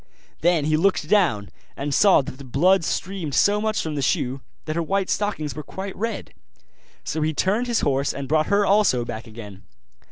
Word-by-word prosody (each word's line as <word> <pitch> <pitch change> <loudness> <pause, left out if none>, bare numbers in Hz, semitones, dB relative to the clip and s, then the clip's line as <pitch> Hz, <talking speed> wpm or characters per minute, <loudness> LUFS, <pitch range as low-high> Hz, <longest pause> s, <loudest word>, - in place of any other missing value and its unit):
Then 170 -3 +2
he 155 0 +2
looked 175 -3 +1
down, 155 - +2 0.3
and 140 +1 -3
saw 190 -3 +5
that 130 +1 -9
the - - -9
blood 170 +9 +3
streamed 175 -3 -3
so 205 +1 +3
much 220 0 -1
from 160 - -4
the 145 - -2
shoe, 130 0 -1 0.2
that 155 0 -3
her 170 - 0
white 195 +3 -1
stockings 205 -8 -2
were 150 - -6
quite 190 +6 -7
red. 225 0 -4 0.7
So 155 - -3
he 155 0 0
turned 210 - +1
his 235 -2 +1
horse 140 0 +1
and 140 -1 -6
brought 155 +2 +2
her 205 0 +2
also 195 - +3
back 110 0 -7
again. 105 -3 -10
155 Hz, 195 wpm, -23 LUFS, 140-195 Hz, 0.7 s, saw